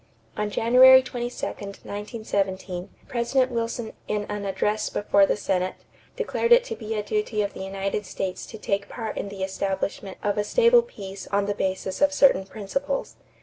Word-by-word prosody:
On 210 0 -1
January 255 +4 +7
22, 245 -1 -4
1917, 200 -2 -4 0.2
President 255 +1 +1
Wilson 230 -1 -3
in 210 -1 -1
an 205 -1 -3
address 210 +2 0
before 200 -1 +3
the - - +1
Senate, 185 -2 -1 0.4
declared 475 -1 -1
it 480 +1 +8
to - - -5
be 220 -1 -5
a 210 - -1
duty 240 - -1
of 200 - -3
the - - -9
United 195 +1 -3
States 190 -1 -4
to 220 - -9
take 200 -1 -2
part 225 -3 -5
in 200 - -4
the 195 -1 -5
establishment 190 0 -3
of 205 0 0
a - - +2
stable 475 - +5
peace 195 - -9
on 200 0 +1
the 205 - 0
basis 190 0 -2
of 290 0 +4
certain 270 -9 +5
principles. 275 +8 -3
210 Hz, 170 wpm, -25 LUFS, 195-245 Hz, 0.4 s, it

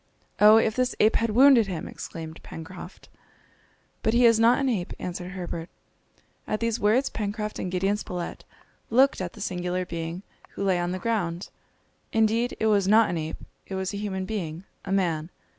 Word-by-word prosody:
"Oh, 210 +1 +8
if 220 -1 +2
this 255 0 0
ape 215 - +4
had 230 - 0
wounded 245 -1 +6
him!" 175 -5 -4
exclaimed 160 0 -8
Pencroft. 175 +3 -10 0.9
"But 220 - +1
he 245 0 +5
is 230 -1 +6
not 230 +2 +5
an 275 - 0
ape," 205 -9 -1
answered 180 +1 -6
Herbert. 175 -2 -5 0.8
At 215 - -1
these 230 0 -1
words 225 +6 +2
Pencroft 210 0 -4
and 180 - -3
Gideon 195 +3 +1
Spilett 180 -4 -6 0.5
looked 260 0 +4
at 180 -2 -4
the - - -11
singular 180 0 -2
being 170 +2 -5 0.3
who - - -4
lay 190 -2 +2
on 175 0 -1
the 185 - -2
ground. 185 -4 -2 0.6
Indeed 225 +2 +1
it - - 0
was 205 -3 +3
not 220 +2 +5
an 175 - -2
ape, 155 0 -5 0.3
it 195 - -5
was 190 +1 -3
a - - -3
human 190 -2 -3
being, 180 -5 -4 0.2
a 195 - -5
man. 170 -5 0
195 Hz, 180 wpm, -26 LUFS, 180-225 Hz, 0.9 s, Oh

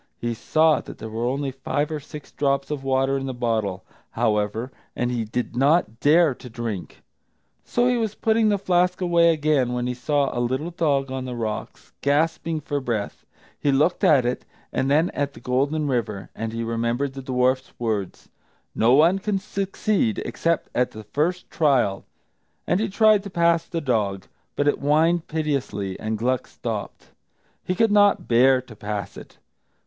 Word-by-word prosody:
He 120 0 -2
saw 155 +7 +2
that - - -11
there 110 - -8
were 115 +2 -2
only 135 +2 -1
five 145 +3 -2
or 155 - -2
six 150 0 -11
drops 140 0 0
of 145 -2 -3
water 135 0 +1
in 135 - -5
the 130 - -4
bottle, 110 -6 -1 0.2
however, 105 +4 -1 0.2
and 120 0 -1
he 120 -2 -1
did 120 +2 -4
not 135 -3 +2
dare 155 0 +4
to 125 - -12
drink. 115 -5 -6 0.6
So 240 0 +1
he 250 -1 +2
was 220 -3 -2
putting 220 -1 +2
the 205 - +2
flask 180 -1 +1
away 170 -2 +4
again 150 -5 +1
when 125 0 -1
he 125 - -1
saw 140 +3 0
a 120 - 0
little 130 +8 -1
dog 140 -5 0
on 130 -1 -4
the 125 -1 -5
rocks, 110 -2 -5
gasping 160 +2 0
for 145 0 -2
breath. 115 -6 -4 0.3
He 145 - +2
looked 150 +6 +2
at 135 -5 +5
it, 125 - -2 0.3
and 135 - 0
then 155 +5 +3
at 140 -1 -3
the - - -11
Golden 140 +5 0
River, 110 -7 -2
and 115 0 -4
he 115 +1 -3
remembered 115 +4 -1
the 135 - -7
dwarf's 130 0 0
words, 110 -5 -3 0.5
"No 115 +3 +3
one 165 +7 +5
can 205 0 -1
succeed 200 +2 -1
except 165 -1 -1
at 125 0 +1
the 110 - -10
first 160 - -1
trial"; 130 -11 +2 0.6
and 180 - +1
he 220 0 0
tried 215 +1 +4
to 200 - -8
pass 170 -2 +2
the 165 -2 -3
dog. 105 -8 -1 0.3
But 145 - 0
it 145 - +2
whined 160 +4 +2
piteously, 135 -11 -2
and 110 0 -2
Gluck 125 +3 -1
stopped. - - -6 0.5
He 185 - -2
could 225 +2 +3
not 205 -1 +4
bear 130 +2 +5
to 120 -4 -13
pass 105 -1 -5
it. - - -12
135 Hz, 180 wpm, -23 LUFS, 120-165 Hz, 0.6 s, at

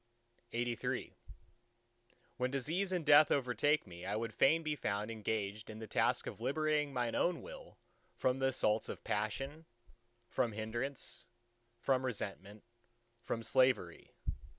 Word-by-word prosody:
LXXXIV 120 0 -2 1.2
When 125 0 +1
disease 160 +9 -1
and 180 -4 -1
death 150 +1 +8
overtake 140 +3 +2
me, 85 -2 -10
I 100 - -2
would 115 0 -2
fain 160 +4 +4
be 155 -1 0
found 105 -3 -2
engaged 105 -1 -3
in 110 - -7
the 110 - -6
task 105 - +1
of - - -6
liberating 150 +2 +1
mine 120 -3 -1
own 180 - +1
Will - - -10 0.4
from 130 +1 +1
the 135 - +3
assaults 110 -4 +2
of - - -6
passion, 135 - -2 0.6
from 115 -3 0
hindrance, 120 +5 -3 0.5
from 130 +2 +1
resentment, 105 -4 -4 0.6
from 115 -1 -3
slavery. 125 -8 +2
125 Hz, 130 wpm, -35 LUFS, 110-145 Hz, 1.2 s, death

